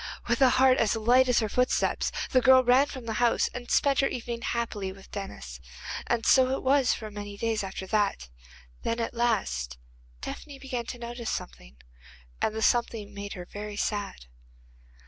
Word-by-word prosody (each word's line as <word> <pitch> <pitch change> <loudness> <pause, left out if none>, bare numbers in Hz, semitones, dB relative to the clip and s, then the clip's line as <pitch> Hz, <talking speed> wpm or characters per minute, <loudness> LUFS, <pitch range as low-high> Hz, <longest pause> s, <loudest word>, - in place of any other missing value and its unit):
With 235 +2 +1
a 260 - +7
heart 260 0 +5
as 220 - +2
light 245 +4 +4
as 245 - +4
her 220 - 0
footsteps, 250 +4 +1 0.2
the 255 - +4
girl 260 +1 +7
ran 255 +3 +5
from 260 -4 -8
the 225 - -3
house, 240 -1 +3
and 245 -1 -7
spent 280 -2 +3
her 275 - +4
evening 235 -1 -5
happily 225 -5 -2
with 190 0 -15
Denis. 65 - -7 0.5
And 235 -1 0
so 260 -1 +5
it - - -8
was 270 -1 +3
for 215 -1 -4
many 205 0 -7
days 225 -1 -1
after 190 0 -5
that. 200 - 0 0.5
Then, 230 +1 -2
at 230 - -2
last, 190 - -1 0.4
Tephany 285 - -7
began 255 -3 -5
to - - -5
notice 235 -1 -5
something, - - -6 0.6
and 220 - 0
the 220 - -2
something 230 -3 +1
made 200 0 -6
her 180 -1 -7
very 205 +2 -7
sad. 205 - -3
230 Hz, 180 wpm, -28 LUFS, 205-250 Hz, 0.6 s, a